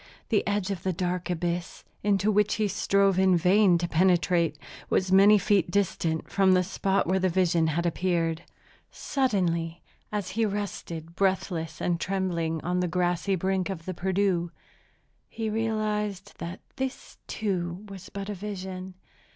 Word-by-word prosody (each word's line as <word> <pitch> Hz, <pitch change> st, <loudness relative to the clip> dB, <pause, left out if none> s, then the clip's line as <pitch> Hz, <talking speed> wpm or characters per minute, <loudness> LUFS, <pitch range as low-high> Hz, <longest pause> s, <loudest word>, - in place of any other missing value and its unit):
The 215 Hz, -, +3 dB
edge 205 Hz, -1 st, 0 dB
of 185 Hz, -4 st, -4 dB
the 185 Hz, 0 st, -1 dB
dark 180 Hz, 0 st, -2 dB
abyss, 175 Hz, 0 st, -3 dB, 0.2 s
into 205 Hz, 0 st, +2 dB
which 210 Hz, 0 st, +2 dB
he 215 Hz, -1 st, +1 dB
strove 195 Hz, -1 st, +2 dB
in 190 Hz, -2 st, +5 dB
vain 185 Hz, +1 st, +4 dB
to 175 Hz, +1 st, -2 dB
penetrate, 170 Hz, -2 st, +2 dB, 0.3 s
was 185 Hz, 0 st, +1 dB
many 200 Hz, +2 st, +7 dB
feet 200 Hz, -3 st, +2 dB
distant 175 Hz, -4 st, 0 dB
from 195 Hz, -1 st, +3 dB
the 185 Hz, 0 st, +4 dB
spot 195 Hz, +1 st, 0 dB
where 190 Hz, +2 st, +1 dB
the 185 Hz, 0 st, +2 dB
vision 170 Hz, -2 st, +2 dB
had 170 Hz, +2 st, 0 dB
appeared. 170 Hz, -1 st, 0 dB, 0.5 s
Suddenly, 175 Hz, -, -1 dB, 0.3 s
as 205 Hz, -3 st, -2 dB
he 225 Hz, +4 st, 0 dB
rested, 175 Hz, -5 st, -4 dB
breathless 175 Hz, -5 st, -1 dB
and 175 Hz, -1 st, 0 dB
trembling, 170 Hz, -4 st, -1 dB
on 180 Hz, +1 st, 0 dB
the 180 Hz, -, +1 dB
grassy 180 Hz, +2 st, 0 dB
brink 190 Hz, +1 st, -1 dB
of 170 Hz, -4 st, -5 dB
the 185 Hz, -, -3 dB
Perdu, 185 Hz, -1 st, 0 dB, 0.8 s
he 220 Hz, -1 st, -3 dB
realized 210 Hz, -3 st, -2 dB
that 170 Hz, +2 st, -6 dB, 0.2 s
this, 265 Hz, -1 st, -5 dB
too, 185 Hz, -2 st, -3 dB
was 195 Hz, -2 st, -10 dB
but 200 Hz, 0 st, -6 dB
a 210 Hz, -, -3 dB
vision. 190 Hz, -2 st, -6 dB
185 Hz, 150 wpm, -27 LUFS, 175-200 Hz, 0.8 s, many